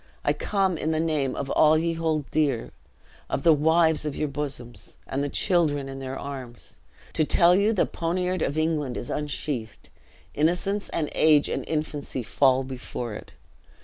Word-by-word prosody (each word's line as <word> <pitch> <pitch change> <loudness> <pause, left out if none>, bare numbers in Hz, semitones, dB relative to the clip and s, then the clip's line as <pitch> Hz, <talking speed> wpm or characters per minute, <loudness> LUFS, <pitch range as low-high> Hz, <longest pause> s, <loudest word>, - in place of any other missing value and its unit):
I - - +3
come 190 -5 0
in 155 - -1
the 160 -1 0
name 155 -5 0
of 140 -1 -4
all 155 0 +5
ye 165 +1 0
hold 160 -3 -1
dear, 140 -7 0 0.6
of - - -2
the 165 - +7
wives 160 +1 +3
of 150 -2 -3
you 150 - -1
bosoms, 130 -7 -6
and 135 +2 -2
the 145 - -2
children 150 -6 +1
in 135 0 -7
their 135 0 -5
arms, 130 -4 -8 0.3
to - - +2
tell 170 +3 +5
you 200 +3 +3
the 210 - +2
poniard 180 +1 -2
of 145 - -1
England 155 -5 0
is - - -5
unsheathed 140 -5 -4 0.4
innocence 180 +6 0
and 155 -3 -2
age 150 -2 +4
and - - -2
infancy 150 -4 -3
fall 130 +2 +3
before 125 -3 -6
it. 105 - -10
150 Hz, 170 wpm, -25 LUFS, 135-165 Hz, 0.6 s, the